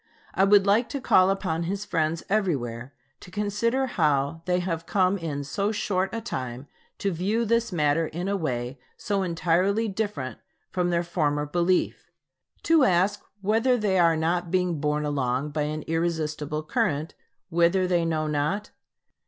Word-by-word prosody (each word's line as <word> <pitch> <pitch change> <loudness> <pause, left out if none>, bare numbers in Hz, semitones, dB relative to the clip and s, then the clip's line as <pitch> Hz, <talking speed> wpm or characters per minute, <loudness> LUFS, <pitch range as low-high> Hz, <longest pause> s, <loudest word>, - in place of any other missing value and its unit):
I 195 - +3
would 200 -1 +5
like 210 +4 +3
to 280 - -3
call 185 -7 +4
upon 190 -4 -1
his 200 +1 -3
friends 160 +1 -1
everywhere 135 - -1 0.3
to - - -13
consider 210 +7 0
how 150 - 0
they 180 -1 +1
have 170 -2 -3
come 185 -1 +2
in 155 -6 -4
so 200 +9 -1
short 195 -3 -1
a 230 - -3
time 130 - -5 0.3
to 200 - -1
view 200 +7 0
this 230 0 +1
matter 155 -1 +1
in 175 +5 -4
a 200 - 0
way 125 -7 -3 0.2
so 200 -1 -1
entirely 185 +5 +1
different 195 -11 -3 0.3
from 180 -1 0
their 170 0 +1
former 150 -4 0
belief; 175 +4 0 0.5
to 325 -3 +4
ask 195 0 +2 0.2
whether 225 +5 +2
they 200 -4 +1
are 165 -2 +4
not 170 +2 0
being 180 -3 0
borne 150 +1 0
along 140 0 -1
by 150 0 -1
an 155 0 -4
irresistible 155 -2 -2
current, 150 0 -1 0.4
whither 170 +3 +3
they 175 -2 +2
know 160 -2 0
not? 150 +8 -1
175 Hz, 160 wpm, -26 LUFS, 150-200 Hz, 0.5 s, would